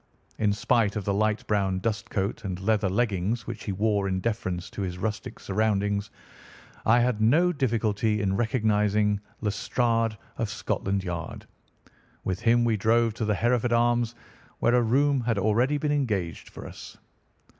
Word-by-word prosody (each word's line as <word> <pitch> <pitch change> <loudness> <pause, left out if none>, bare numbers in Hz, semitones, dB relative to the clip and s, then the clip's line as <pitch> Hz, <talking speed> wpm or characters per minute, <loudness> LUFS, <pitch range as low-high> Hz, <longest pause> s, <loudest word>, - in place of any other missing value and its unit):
In 105 -1 +3
spite 105 0 +1
of 105 -3 -3
the 100 - +1
light 110 +1 0
brown 100 -3 +1
dustcoat 110 0 -2
and 95 -3 -4
leather 100 0 +1
leggings 105 +1 0
which 115 -2 -7
he 100 - -2
wore 100 0 +1
in 95 -1 -1
deference 95 -5 -3
to - - -5
his 90 -2 -3
rustic 105 +3 -4
surroundings, 100 0 0 0.8
I 120 +2 +6
had 120 -3 +1
no 165 +11 +4
difficulty 110 -5 0
in 95 -2 0
recognising 105 -3 +1 0.2
Lestrade, 115 +1 0 0.2
of 115 -3 -1
Scotland 100 -2 -2
Yard. 85 -3 -5 0.8
With 95 0 -2
him 120 +1 +3
we 115 -2 +2
drove 115 +2 +2
to 115 0 -3
the 105 -1 +1
Hereford 120 +1 +1
Arms 120 0 +2 0.4
where 120 - +2
a 125 - +5
room 135 +4 +2
had 115 -2 0
already 115 +8 +2
been 145 +1 -1
engaged 105 - -1
for - - -10
us. - - -10
110 Hz, 155 wpm, -26 LUFS, 100-120 Hz, 0.8 s, I